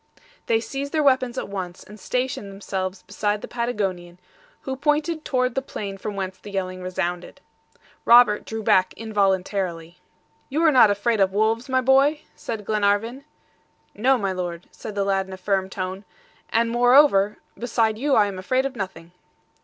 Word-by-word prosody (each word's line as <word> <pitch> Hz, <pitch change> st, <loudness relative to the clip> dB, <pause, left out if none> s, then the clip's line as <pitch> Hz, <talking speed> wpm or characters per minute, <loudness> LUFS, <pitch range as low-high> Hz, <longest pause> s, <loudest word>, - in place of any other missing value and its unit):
They 225 Hz, -, +3 dB
seized 275 Hz, +5 st, -5 dB
their 310 Hz, -1 st, +2 dB
weapons 260 Hz, -2 st, +2 dB
at -, -, -3 dB
once, 185 Hz, -3 st, -6 dB
and 210 Hz, +1 st, -13 dB
stationed 250 Hz, -2 st, -2 dB
themselves 190 Hz, -1 st, -4 dB
beside 210 Hz, 0 st, -2 dB
the -, -, -5 dB
Patagonian, 195 Hz, -8 st, -3 dB, 0.4 s
who 265 Hz, -, -4 dB
pointed 300 Hz, +3 st, 0 dB
toward 255 Hz, -2 st, 0 dB
the 270 Hz, -, -1 dB
plain 200 Hz, -7 st, -6 dB
from 210 Hz, +1 st, -5 dB
whence 190 Hz, -1 st, -4 dB
the 210 Hz, -, -11 dB
yelling 185 Hz, -2 st, -4 dB
resounded. 180 Hz, -1 st, -4 dB, 0.6 s
Robert 235 Hz, -3 st, +6 dB
drew 220 Hz, 0 st, -5 dB
back 185 Hz, -2 st, +3 dB
involuntarily. 190 Hz, -5 st, -1 dB, 0.5 s
"You 310 Hz, +5 st, 0 dB
are 320 Hz, -, +6 dB
not 250 Hz, -6 st, +7 dB
afraid 210 Hz, +2 st, +1 dB
of 190 Hz, -1 st, +3 dB
wolves, 225 Hz, +5 st, +1 dB
my 260 Hz, 0 st, +2 dB
boy?" 275 Hz, +4 st, +3 dB
said 220 Hz, -3 st, -6 dB
Glenarvan. 215 Hz, +5 st, 0 dB, 0.7 s
"No, 260 Hz, +5 st, +3 dB
my 200 Hz, -4 st, -1 dB
Lord," 175 Hz, -2 st, -5 dB
said 215 Hz, -, -9 dB
the 200 Hz, -, +1 dB
lad 195 Hz, -1 st, 0 dB
in 190 Hz, -, -9 dB
a -, -, -7 dB
firm 190 Hz, 0 st, -1 dB
tone, 190 Hz, +1 st, -5 dB, 0.5 s
"and 230 Hz, 0 st, +1 dB
moreover, 240 Hz, -4 st, +5 dB, 0.2 s
beside 225 Hz, -2 st, 0 dB
you 280 Hz, +1 st, +2 dB
I 210 Hz, -, +5 dB
am 195 Hz, -2 st, -5 dB
afraid 255 Hz, +8 st, 0 dB
of 275 Hz, -1 st, -4 dB
nothing." 185 Hz, -5 st, -6 dB
210 Hz, 170 wpm, -23 LUFS, 190-250 Hz, 0.7 s, not